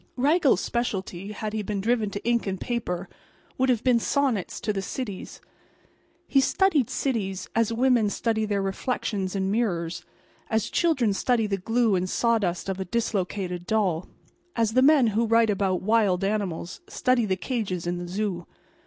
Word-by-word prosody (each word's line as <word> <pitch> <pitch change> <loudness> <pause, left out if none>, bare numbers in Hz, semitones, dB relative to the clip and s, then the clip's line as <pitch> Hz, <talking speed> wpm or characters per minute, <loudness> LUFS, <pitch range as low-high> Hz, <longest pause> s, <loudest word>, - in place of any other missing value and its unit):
Raggles's 290 +2 +3
specialty, 195 -5 -3
had 210 0 -5
he 220 - -1
been 205 0 -3
driven 220 0 +1
to 205 - -6
ink 235 -3 +1
and 190 -1 -2
paper, 195 -7 -3 0.5
would 260 0 +3
have 240 -4 +2
been 250 -3 +4
sonnets 255 - 0
to 210 - -1
the 195 - -2
cities. 200 0 -6 0.9
He 275 - +4
studied 310 - +2
cities 195 -8 -2
as 230 -1 +2
women 235 -2 +3
study 220 +1 0
their 200 -2 -1
reflections 195 -1 -2
in 190 0 0
mirrors; 175 -7 -1 0.5
as 220 -1 0
children 270 - +2
study 230 +3 +1
the 200 -2 -1
glue 225 +3 +2
and 185 0 0
sawdust 205 -8 +1
of 195 -1 -3
a 190 - -2
dislocated 185 -4 -2
doll; 190 -6 0 0.5
as 225 -2 +1
the 255 - +4
men 280 -1 +6
who 230 +2 +1
write 230 -1 +4
about 190 -2 0
wild 205 -3 +2
animals 195 -4 -2
study 255 -3 +1
the 190 -1 0
cages 190 -7 -3
in 175 0 -2
the 175 - -6
zoo. 185 -2 -3
210 Hz, 165 wpm, -26 LUFS, 190-235 Hz, 0.9 s, men